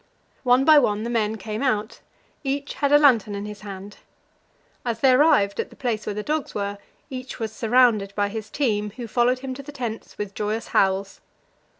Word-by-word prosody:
One 250 +1 +4
by 310 -1 +8
one 210 -5 0
the 235 - -3
men 220 -2 0
came 215 +1 -5
out; 220 -5 -1 0.4
each 280 +1 -2
had 285 -1 0
a 290 - +8
lantern 235 -8 +4
in 200 +1 -5
his 210 -1 -8
hand. 200 0 -9 0.9
As 235 -2 -2
they 265 - +6
arrived 255 -8 +4
at - - -2
the - - -16
place 230 -4 -3
where 205 - -2
the 210 - -3
dogs 305 +1 -2
were, 200 0 -3 0.3
each 255 0 -6
was 220 -2 -4
surrounded 225 -4 +3
by 205 -1 +1
his 215 0 -6
team, 210 -6 0
who 245 - -6
followed 245 +3 +2
him 260 - -3
to 270 - -8
the 285 +2 -10
tents 240 -5 -6
with 205 -1 -5
joyous 215 +2 -3
howls. 195 0 +1
225 Hz, 200 wpm, -24 LUFS, 210-255 Hz, 0.9 s, by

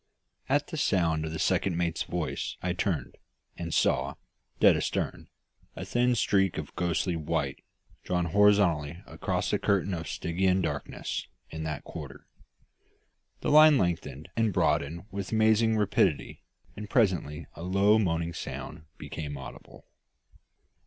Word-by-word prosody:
At 145 +2 +2
the 160 - -5
sound 80 - +1
of 80 - -4
the 80 - -4
second 85 +2 +1
mate's 85 -2 -1
voice 85 -3 -3
I 90 -1 0
turned, 85 -7 -2 0.4
and 85 -1 -5
saw, - - +1 0.4
dead - - +6
astern, - - -2 0.5
a - - -6
thin 125 +1 +2
streak 95 -4 +2
of - - -6
ghostly 85 0 0
white, 80 -2 -2 0.4
drawn 90 -1 0
horizontally 90 -4 +3
across - - -2
the - - +1
curtain 100 -1 +1
of 85 -2 -4
Stygian 90 +2 0
darkness 75 -4 -4 0.2
in 80 0 -5
that 75 -2 -4
quarter. - - -9 1.2
The - - 0
line 155 -1 +8
lengthened 85 - -2
and 115 -2 +2
broadened 85 -1 0
with 100 0 -5
amazing 110 0 +3
rapidity; 105 -2 +1 0.3
and 105 0 -7
presently 90 - +1
a - - -11
low 100 +4 +3
moaning 85 -4 0
sound 80 - -7
became 75 -3 -6
audible. 65 - -11
90 Hz, 135 wpm, -28 LUFS, 80-105 Hz, 1.2 s, line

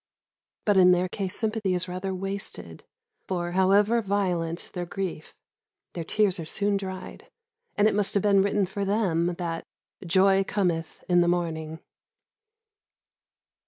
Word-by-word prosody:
But 205 -2 +3
in 180 -1 +7
their 180 +1 +1
case 190 +1 -4
sympathy 215 -4 0
is 180 +1 -2
rather 185 +2 -4
wasted, 195 +1 -6 0.4
for, 175 -2 -2
however 200 +5 +3
violent 180 -5 -1
their 175 -1 -4
grief, 180 -4 -5 0.6
their 170 - -4
tears 200 +1 +1
are - - -3
soon 200 +5 -1
dried, 190 -1 -6 0.5
and 205 +1 +5
it - - +2
must 205 0 0
have 200 - +2
been 200 -2 +5
written 200 0 +1
for 200 +2 -4
them 180 -4 +1
that 165 -2 -3 0.4
"joy 190 +2 +4
cometh 175 -5 -2
with 175 -1 +4
the 175 - +2
morning." 160 -2 -2
190 Hz, 140 wpm, -26 LUFS, 175-200 Hz, 0.6 s, in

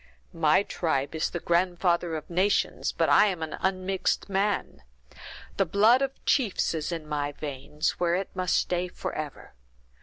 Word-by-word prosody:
"My 165 +3 +3
tribe 150 -8 -1
is 160 - -1
the 175 - -4
grandfather 175 -1 +1
of 155 - -6
nations, 185 +4 +1
but - - +1
I 210 - +6
am 180 -5 -2
an 160 - -4
unmixed 190 +1 -1
man. 200 +1 -1 0.8
The 195 - +3
blood 220 +8 +5
of 270 0 -3
chiefs 240 -11 +1
is 160 +1 -3
in 165 -3 -5
my 145 -1 -2
veins, 150 +1 -3
where 175 -1 +2
it 190 +1 -4
must 185 -1 0
stay 180 0 0
forever. 155 - -6
175 Hz, 155 wpm, -27 LUFS, 155-195 Hz, 0.8 s, I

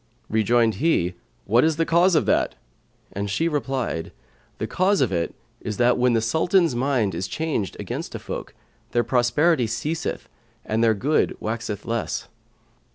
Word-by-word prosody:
Rejoined 110 +1 +3
he, 95 - +2 0.3
"What 115 +4 +4
is 160 0 +3
the 165 +1 +1
cause 175 +2 +4
of 155 - +3
that?"; - - +1 0.6
and 100 +1 -3
she 110 +12 +1
replied, 135 - -2 0.5
"The - - -2
cause 190 +1 +2
of 130 -7 +2
it 85 -2 -1 0.2
is 105 - -5
that 125 0 +4
when 125 -1 +2
the 115 - +2
Sultan's[FN#125] 160 - +2
mind 120 -5 +1
is 90 +3 -3
changed 145 - -2
against - - -5
a - - -1
folk, - - -7 0.4
their 120 - +3
prosperity 125 +4 +2
ceaseth 150 +9 -3 0.4
and 110 +1 0
their 110 -1 +4
good 145 +9 +1
waxeth 110 -2 -4
less." 115 0 -2
120 Hz, 160 wpm, -23 LUFS, 110-155 Hz, 0.6 s, What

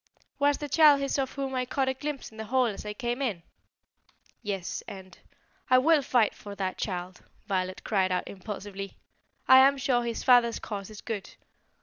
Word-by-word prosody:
"Was 285 0 +3
the 295 - -5
child 295 -1 +6
his 275 0 -1
of 265 -1 -2
whom 270 -1 -4
I 255 -1 0
caught 265 +1 -1
a 265 - +1
glimpse 285 -1 -5
in 220 - -16
the 220 - -5
hall 255 +3 +2
as 210 -2 -4
I 210 - -3
came 240 +4 -3
in?" 205 -11 -2 1.0
"Yes, 195 -5 -4
and 185 -2 -10 0.3
" - - -39
"I 255 - +6
will 305 +3 +4
fight 245 -5 +2
for 205 -1 -10
that 190 -2 -3
child!" 180 -2 -4 0.2
Violet 185 -2 -2
cried 190 -3 +1
out 180 - -1
impulsively. 195 0 -7 0.5
"I 260 - +9
am 275 +1 +5
sure 250 -2 +1
his 235 -1 -3
father's 245 -2 +5
cause 200 -2 -6
is 215 -1 -10
good. 215 -4 -6
235 Hz, 195 wpm, -28 LUFS, 195-265 Hz, 1.0 s, I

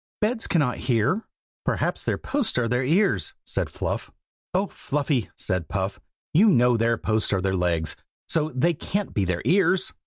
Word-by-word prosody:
"Beds 225 +2 0
cannot 145 -8 +1
hear." 125 - +2 0.4
"Perhaps - - 0
their - - 0
posts 280 - -1
are 120 -2 +2
their 125 +2 +1
ears," 180 +10 +1
said - - -1
Fluff. - - -3 0.4
"Oh! 190 +2 +1
Fluffy," 145 - -1
said 90 -3 -2
Puff, 95 +1 -2 0.3
"you 210 +7 +6
know 125 -7 +4
their 115 0 +2
posts 110 0 0
are 100 - +2
their 95 0 0
legs, 85 -3 +1 0.3
so 155 -1 +2
they 170 +7 +3
can't 200 +5 -3
be 100 - +1
their 90 -1 -1
ears." 190 0 +3
125 Hz, 165 wpm, -25 LUFS, -, 0.4 s, you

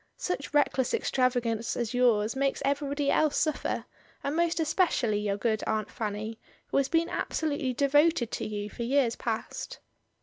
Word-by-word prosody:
"Such 360 -5 -3
reckless 285 -3 +2
extravagance 245 -3 0
as 235 -1 -2
yours 235 -3 +3
makes 275 0 0
everybody 280 0 0
else 305 -2 +2
suffer, 310 -1 -1 0.4
and 280 +2 -1
most 340 0 +1
especially 310 - +2
your 205 -1 -1
good 220 0 0
Aunt 215 -1 -1
Fanny, 215 +1 -4 0.3
who - - 0
has 275 -1 +3
been 330 0 +2
absolutely 290 -4 -1
devoted 285 -1 +3
to - - -3
you 205 -1 -4
for 225 - -9
years 245 -1 +2
past." 225 -2 -4
255 Hz, 155 wpm, -28 LUFS, 225-290 Hz, 0.4 s, yours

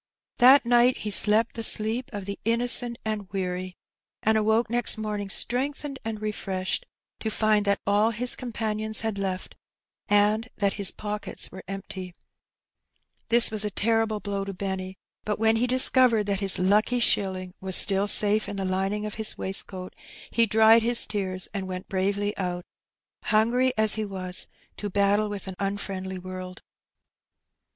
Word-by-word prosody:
That 260 +2 +7
night 240 +1 +4
he 210 - -5
slept 215 +3 +3
the 230 - -5
sleep 220 +3 +2
of 205 -3 -6
the 200 0 -6
innocent 235 +1 +4
and 210 -3 -4
weary^ 185 -1 -4 0.5
and 220 +1 +2
awoke 220 +2 +2
next 240 0 +2
morning 210 -2 -4
strengthened 275 +5 -1
and 220 -1 -5
refreshed, 210 - -4 0.3
to 220 - -3
find 215 -1 +1
that 200 0 +1
all 205 +2 +2
his 240 +2 -1
companions 220 -2 -1
had 220 -3 -3
left 190 -1 -4 0.5
and 210 +3 +2
that 200 -1 0
his 200 -2 +1
pockets 210 0 -5
were 190 - -9
empty! 190 -2 -7 1.1
This 235 0 +6
was 215 -1 +1
a 210 - -1
terrible 220 +1 0
blow 200 -1 -4
to 195 -1 -7
Benny; 190 0 -5 0.3
but 210 - -2
when 225 +1 +3
he 245 +2 0
dis 255 +1 +5
covered 240 -5 +3
that 200 -1 -1
his 195 -2 +1
"hicky 210 +6 +2
shilling 190 -5 0
'^ - - -21
was 190 -1 +3
still 195 0 +5
safe 210 +1 +3
in 205 - -5
the 195 -1 -3
lining 195 +3 -2
of 210 - -5
his 220 - -2
waistcoat^ 190 -1 -5 0.4
he 230 -1 +2
dried 220 +2 +5
his 235 +1 +1
tears^ 185 -3 -4
and 195 -2 -4
went 185 0 -6
bravely 200 +2 -1
out^ 180 -2 -3 0.6
hungry 235 +4 +2
as 215 -1 +3
he 220 - -1
was^ 185 -3 -5 0.3
to 205 - -5
battle 205 +2 +1
with 205 -1 -7
an 190 - -5
unfriendly 195 -1 -4
world. 185 0 -9
210 Hz, 165 wpm, -25 LUFS, 195-225 Hz, 1.1 s, That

